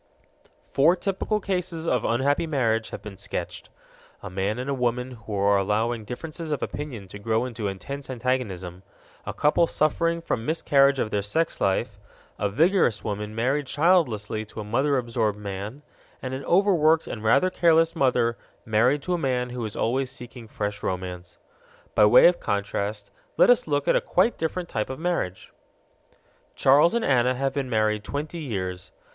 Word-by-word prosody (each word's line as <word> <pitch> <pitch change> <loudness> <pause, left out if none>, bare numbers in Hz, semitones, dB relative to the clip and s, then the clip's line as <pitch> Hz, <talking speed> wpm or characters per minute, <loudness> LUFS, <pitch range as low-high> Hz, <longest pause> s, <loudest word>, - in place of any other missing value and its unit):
Four 155 +6 +4
typical 195 +3 -1
cases 180 -4 -3
of 125 -7 +1
unhappy 140 +7 +1
marriage 115 -7 0
have - - -8
been 100 -3 -9
sketched: - - -5 0.5
a - - -7
man 95 +4 -1
and 130 +1 -3
woman 125 +1 -1
who 110 -3 -7
are 100 0 +3
allowing 110 +3 0
differences 155 +7 -6
of 150 - -1
opinion 125 -10 -6
to 100 - -9
grow 110 +3 0
into 115 -4 -4
intense 135 +10 -6
antagonism, 115 -8 -3 0.5
a - - -3
couple 155 +3 +3
suffering 165 +2 +1
from 115 -8 -3
miscarriage 140 -2 +3
of 110 -4 -1
their 105 - 0
sex 160 +12 -1
life, 100 +2 0 0.4
a 100 - 0
vigorous 155 - +2
woman 105 0 -4
married 130 +5 0
childlessly 130 - +1
to 110 - -10
a - - -4
mother 135 +7 +1
absorbed 115 -4 -1
man, 105 +6 -6 0.4
and 130 0 -5
an 135 +1 -5
overworked 170 -4 +3
and 110 - -6
rather 150 +12 +3
careless 165 -1 +3
mother 125 -5 +2 0.3
married 125 +7 +2
to 180 - -1
a 175 - 0
man 125 -4 -1
who 125 -1 -4
is 105 - -6
always 130 +3 0
seeking 120 -2 -10
fresh 105 -1 -4
romance. 90 -1 -5 0.6
By 105 - +5
way 105 - +7
of 175 0 +5
contrast 100 0 -3 0.3
let - - +7
us - - +2
look - - 0
at - - +4
a - - +3
quite 240 - +1
different 170 +2 -2
type 105 - -3
of 130 - -5
marriage. 160 - -3 1.0
Charles 145 - +5
and 235 - 0
Anna 130 -1 +3
have 135 +1 -1
been 135 -2 -3
married 110 -2 +1
twenty 150 - -5
years. 95 - -5
125 Hz, 170 wpm, -25 LUFS, 105-155 Hz, 1.0 s, way